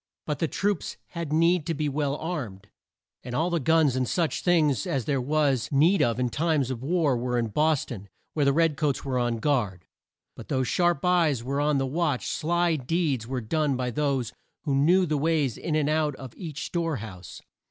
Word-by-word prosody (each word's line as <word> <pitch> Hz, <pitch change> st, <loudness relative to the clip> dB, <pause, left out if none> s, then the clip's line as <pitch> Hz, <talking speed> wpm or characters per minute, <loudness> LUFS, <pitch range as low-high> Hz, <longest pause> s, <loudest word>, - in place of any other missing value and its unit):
But 150 Hz, -2 st, -3 dB
the 165 Hz, -, +1 dB
troops 200 Hz, +2 st, -2 dB
had 170 Hz, -4 st, -5 dB
need 165 Hz, +1 st, +3 dB
to 165 Hz, -, -1 dB
be 150 Hz, +1 st, -1 dB
well 145 Hz, 0 st, -1 dB
armed; 125 Hz, -, -5 dB, 0.5 s
and 125 Hz, 0 st, -5 dB
all 170 Hz, +5 st, +1 dB
the 170 Hz, -, +1 dB
guns 155 Hz, -2 st, +3 dB
and 130 Hz, -2 st, 0 dB
such 170 Hz, -3 st, 0 dB
things 155 Hz, -, +2 dB
as 130 Hz, -5 st, -1 dB
there 140 Hz, -3 st, 0 dB
was 140 Hz, -3 st, +1 dB
need 160 Hz, +8 st, +4 dB
of 120 Hz, +1 st, +1 dB
in 125 Hz, -, +1 dB
war -, -, -1 dB
times 150 Hz, -4 st, 0 dB
were 130 Hz, -3 st, 0 dB
in 115 Hz, -2 st, 0 dB
Bos 150 Hz, +5 st, +1 dB
ton, 100 Hz, -5 st, -8 dB, 0.2 s
where 150 Hz, -, +1 dB
the 140 Hz, -, +4 dB
red 160 Hz, 0 st, +2 dB
coats 150 Hz, -4 st, -1 dB
were 130 Hz, -2 st, 0 dB
on 120 Hz, -1 st, 0 dB
guard. 105 Hz, -, -1 dB, 0.5 s
But -, -, -10 dB
though 130 Hz, -2 st, 0 dB
sharp 175 Hz, +3 st, +1 dB
eyes 165 Hz, -9 st, +2 dB
were 140 Hz, +3 st, -1 dB
on 150 Hz, -1 st, +2 dB
the 135 Hz, -, 0 dB
watch, 150 Hz, -1 st, -1 dB
sly 170 Hz, 0 st, +1 dB
deeds 140 Hz, -4 st, -1 dB
were 130 Hz, 0 st, -3 dB
done 145 Hz, +4 st, 0 dB
by 125 Hz, -1 st, -2 dB
those 135 Hz, -3 st, -1 dB, 0.3 s
who 145 Hz, -, -1 dB
knew 170 Hz, +7 st, +4 dB
the 155 Hz, -3 st, 0 dB
ways 150 Hz, -5 st, +1 dB
in 155 Hz, -, -3 dB
and 150 Hz, -2 st, +1 dB
out 155 Hz, -2 st, +1 dB
of 130 Hz, -3 st, -10 dB
each 155 Hz, -6 st, -6 dB
store 165 Hz, -3 st, -1 dB
house. 95 Hz, -7 st, -9 dB
145 Hz, 205 wpm, -26 LUFS, 125-160 Hz, 0.5 s, need